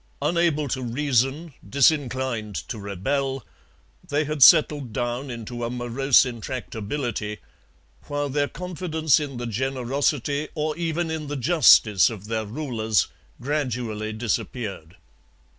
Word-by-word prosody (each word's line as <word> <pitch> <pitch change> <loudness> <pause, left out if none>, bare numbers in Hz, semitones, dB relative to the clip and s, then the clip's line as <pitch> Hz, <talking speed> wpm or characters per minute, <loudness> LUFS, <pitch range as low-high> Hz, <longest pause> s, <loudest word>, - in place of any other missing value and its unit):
Unable 155 -1 +1
to 130 - -2
reason, 135 +4 0 0.2
disinclined 130 -6 +1
to 115 - -5
rebel, 130 +7 -2 0.6
they 145 +2 +1
had 155 -1 -4
settled 150 -4 +6
down 120 +3 -2
into 120 0 -6
a 115 - -1
morose 125 +3 +3
intractability, 115 -2 -4 0.7
while 145 0 -2
their 145 +1 0
confidence 160 -4 0
in 140 -4 -5
the 120 - -4
generosity 135 +4 -1
or 155 -1 -1
even 170 0 -2
in 155 -2 -4
the 145 0 -3
justice 120 - +5
of 105 -4 -8
their 110 0 -2
rulers 110 - 0 0.3
gradually 120 -6 -2
disappeared. 110 -5 -4
130 Hz, 115 wpm, -24 LUFS, 115-150 Hz, 0.7 s, settled